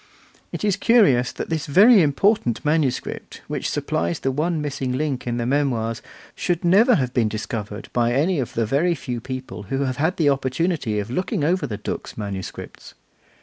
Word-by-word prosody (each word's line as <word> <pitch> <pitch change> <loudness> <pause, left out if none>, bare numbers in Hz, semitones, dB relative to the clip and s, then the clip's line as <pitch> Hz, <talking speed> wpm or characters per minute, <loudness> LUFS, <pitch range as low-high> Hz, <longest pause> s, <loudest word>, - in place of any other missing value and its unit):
It - - -5
is 200 -2 +1
curious 200 - +4
that - - -6
this 160 -2 -2
very 200 - +7
important 150 - +1
manuscript, 150 -4 -1
which - - -3
supplies 85 +1 -1
the 135 - -1
one 155 +4 -1
missing 135 -3 -3
link 135 -2 -2
in 120 0 -1
the 120 - -1
Memoirs, 120 -4 0 0.3
should 175 -1 -2
never 215 +8 +5
have 130 -5 -1
been 115 -4 +2
discovered 105 -1 -5
by 120 -1 +2
any 155 +5 +1
of 125 - -4
the 115 - +1 0.3
few 125 -4 -5
people 130 -3 -6
who 135 +1 -1
have 130 -2 -1
had 160 +6 0
the 150 -4 +3
opportunity 135 -2 -1
of 105 +2 -3
looking 185 - -1
over 165 0 +1
the 105 -4 -4
Dux 105 - -6
manuscripts. 100 -3 -7
135 Hz, 175 wpm, -22 LUFS, 120-165 Hz, 0.3 s, very